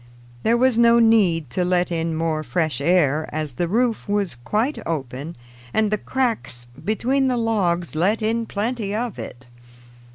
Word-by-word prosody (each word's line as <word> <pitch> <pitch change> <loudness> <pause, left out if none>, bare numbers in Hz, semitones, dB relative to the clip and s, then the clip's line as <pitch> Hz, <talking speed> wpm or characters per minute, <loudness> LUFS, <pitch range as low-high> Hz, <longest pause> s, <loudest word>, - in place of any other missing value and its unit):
There 230 - +2
was 250 -1 +3
no 235 0 +6
need 195 - +3
to 180 - 0
let 180 0 +1
in 165 -1 -1
more 160 -1 -1
fresh 155 -1 -1
air, 155 -2 +2
as 155 -3 -3
the 170 +8 -1
roof 230 +4 0
was 200 -3 0
quite 215 - -1
open 145 0 -4 0.4
and 215 -1 +2
the 215 - +2
cracks 230 - -2 0.2
between 255 +7 +1
the 250 -1 +1
logs 185 -7 0
let 200 +8 +1
in 225 +1 0
plenty 210 -1 -2
of 235 -1 -3
it. 125 +2 -8
195 Hz, 160 wpm, -22 LUFS, 160-230 Hz, 0.4 s, no